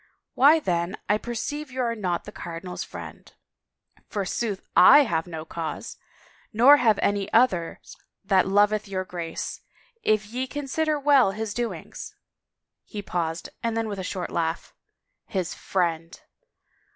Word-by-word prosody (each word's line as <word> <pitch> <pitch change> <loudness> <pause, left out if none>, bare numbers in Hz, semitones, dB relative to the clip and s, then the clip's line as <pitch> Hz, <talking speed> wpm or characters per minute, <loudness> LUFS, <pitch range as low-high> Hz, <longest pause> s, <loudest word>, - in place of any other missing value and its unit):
"Why 295 +5 +6
then 175 - -1
I 210 +1 +2
perceive 290 +6 -4
you 260 0 -3
are 235 -1 0
not 185 -6 -2
the 210 - -9
cardinal's 175 -1 -6
friend." - - -10 0.4
" - - -35
Forsooth, 200 +1 -2
/ - - -48
have 200 - +6
no 160 -2 -6
cause!... 160 -1 -5 0.5
Nor 250 +6 +7
have 225 -6 +3
any 200 0 0
others 205 -9 +1 0.3
that 190 -1 +3
loveth 205 +2 +3
your 185 -1 -3
Grace, 170 -3 -5 0.4
if 215 - +2
ye 250 +5 -4
consider 290 +2 -1
well 275 -8 +4
his 215 0 -4
doings." 240 0 -5 0.7
She 205 -1 -6
paused 165 -3 -3
and 230 -1 -1
then 225 -1 -1
with 200 -2 -5
a - - -3
short 185 -1 -4
laugh, 165 0 -2 0.3
" - - -54
His 185 -4 -2
friend!'' 165 -3 -2
205 Hz, 145 wpm, -25 LUFS, 175-240 Hz, 0.7 s, Nor